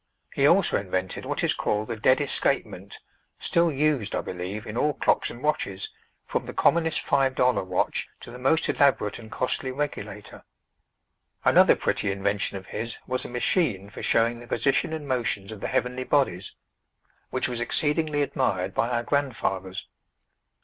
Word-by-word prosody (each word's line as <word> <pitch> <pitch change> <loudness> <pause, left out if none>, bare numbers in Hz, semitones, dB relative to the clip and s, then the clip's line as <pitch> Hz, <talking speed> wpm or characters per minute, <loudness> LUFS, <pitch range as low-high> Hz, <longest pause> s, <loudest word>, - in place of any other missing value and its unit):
He - - +3
also - - +4
invented 95 -1 -3
what - - -2
is - - +3
called 105 +1 -1
the 115 - -2
"dead 130 +6 +3
escapement," 145 - -1 0.4
still 170 -1 +2
used, 145 -6 0
I - - 0
believe, 95 +4 -5
in 110 - -7
all 145 +3 +1
clocks - - +2
and 120 - -10
watches, 100 -10 -1 0.3
from - - -3
the - - -7
commonest 160 -1 +2
five 135 -2 +1
dollar 125 -5 +2
watch 90 0 -1
to - - -9
the 125 - -9
most 135 +6 +2
elaborate 135 -7 +2
and 110 -1 -11
costly 130 +1 0
regulator. 105 -7 -5 1.0
Another - - +6
pretty 100 - -1
invention 100 0 -1
of 95 - -10
his 115 +3 -5
was 130 0 -1
a - - -6
machine 120 - 0
for - - -8
showing 115 +1 +2
the 120 - -12
position 135 +4 +1
and 155 -2 -5
motions 110 -6 -1
of 110 - -8
the - - -2
heavenly 125 +1 -1
bodies, 125 -10 0 0.7
which 130 - +2
was 120 -1 -2
exceedingly 150 +3 +2
admired 95 -9 -1
by 115 - 0
our 120 -1 0
grandfathers. 95 -10 -2
120 Hz, 165 wpm, -26 LUFS, 100-140 Hz, 1.0 s, Another